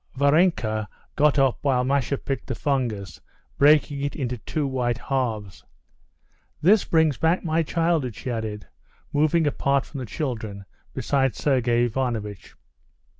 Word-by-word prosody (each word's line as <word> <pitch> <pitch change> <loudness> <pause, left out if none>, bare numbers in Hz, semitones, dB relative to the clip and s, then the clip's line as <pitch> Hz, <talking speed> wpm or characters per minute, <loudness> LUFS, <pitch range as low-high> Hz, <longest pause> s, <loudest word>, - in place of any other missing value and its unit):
Varenka 140 - +2 0.3
got 150 0 +3
up 135 -3 +3
while 130 -3 +2
Masha 140 0 0
picked 135 0 -4
the 130 - -3
fungus, 115 - -2 0.4
breaking 145 -1 +4
it 140 0 -2
into 125 -4 -3
two 150 +7 -2
white 125 -3 -1
halves. 115 -8 -3 1.0
"This 195 +7 +5
brings 160 -5 +2
back 165 +3 +2
my 165 -1 +1
childhood," 165 - 0
she 130 - -5
added, 110 -3 -4 0.5
moving 155 +2 +3
apart 140 -1 +1
from 140 - -8
the 125 - -5
children 110 - -4 0.3
beside 135 -2 +1
Sergey 120 -4 +2
Ivanovitch. 115 -5 -3
135 Hz, 130 wpm, -24 LUFS, 120-150 Hz, 1.0 s, This